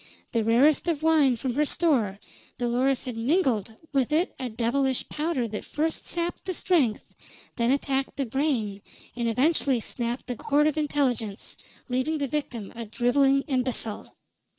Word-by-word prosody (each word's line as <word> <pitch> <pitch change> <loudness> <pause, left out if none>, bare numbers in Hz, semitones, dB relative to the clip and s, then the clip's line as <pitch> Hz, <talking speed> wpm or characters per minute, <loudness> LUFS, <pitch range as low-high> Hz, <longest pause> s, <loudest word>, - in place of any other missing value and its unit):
The 230 -2 +1
rarest 260 +9 +4
of 315 -3 0
wine 305 -6 +4
from 250 +1 -3
her 295 +4 +2
store, 275 - +2 0.4
Dolores 250 +2 +1
had 250 -3 -4
mingled 230 - +1 0.2
with 270 -2 +1
it 325 +4 +1
a 255 -2 -3
devilish 250 +4 0
powder 300 -6 -1
that 210 - -5
first 315 +2 -2
sapped 345 0 -3
the 370 - -2
strength, 290 - +1 0.4
then 235 -1 +1
attacked 270 0 0
the 275 - 0
brain, 235 -6 -1 0.3
and 235 -1 0
eventually 270 +1 +2
snapped 235 +2 -3
the 250 - -4
cord 295 +3 +2
of 305 - +2
intelligence, 265 -9 -1 0.3
leaving 260 +5 0
the 285 -2 -1
victim 245 -7 -4
a 230 0 -5
driveling 270 +5 +2
imbecile. 255 -5 -2
265 Hz, 150 wpm, -26 LUFS, 235-295 Hz, 0.4 s, rarest